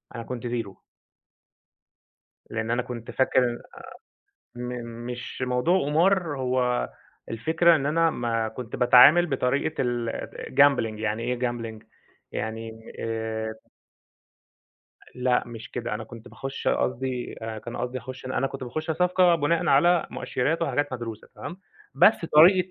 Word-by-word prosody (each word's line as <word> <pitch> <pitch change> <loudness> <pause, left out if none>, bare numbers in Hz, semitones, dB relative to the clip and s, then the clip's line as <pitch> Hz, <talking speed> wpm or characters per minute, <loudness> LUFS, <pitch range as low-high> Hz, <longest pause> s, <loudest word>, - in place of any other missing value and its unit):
أنا 115 - -5
كنت 120 0 -5
0. 115 -5 -4 1.7
لأن 110 0 -3
أنا 120 +1 +1
كنت 120 -2 -7
فاكر 125 -2 +1 0.9
م 125 0 -5 0.4
مش 125 +1 -6
موضوع 125 +9 +2
قمار، 165 0 +2
هو 125 - 0 0.4
الفكرة 160 +8 +3
إن 140 -3 -1
أنا 165 +3 +3
ما 115 -5 -1
كنت 115 +1 -7
باتعامل 130 +8 +7
بطريقة 140 +1 0
الgambling 120 0 +1
يعني 110 +1 -2
إيه 125 +1 -2
gambling 120 -3 -3 0.5
يعني 110 +1 -6
آآ 110 -1 -3 1.6
لأ، 125 0 +1
مش 115 -1 -9
كده. 120 -3 -3
أنا 110 - -5
كنت 115 +1 -12
باخُش 135 +2 -4
قصدي 125 0 -1
أنا 110 -1 -4
كان 120 +2 -8
قصدي 125 +1 -3
أخُش 130 +1 -9
أنا 130 - -2
أنا 135 - +1
كنت 135 -1 -6
باخُش 155 +6 -4
صفقة 180 +2 +4
بناءً 165 +1 +1
على 170 +5 +4
مؤشِرات 155 +7 -1
وحاجات 145 -4 0
مدروسة، 115 -3 -6
تمام، 175 - -8 0.3
بس 180 +10 +7 0.2
طريقة 180 +4 +6
125 Hz, 130 wpm, -26 LUFS, 115-145 Hz, 1.7 s, باتعامل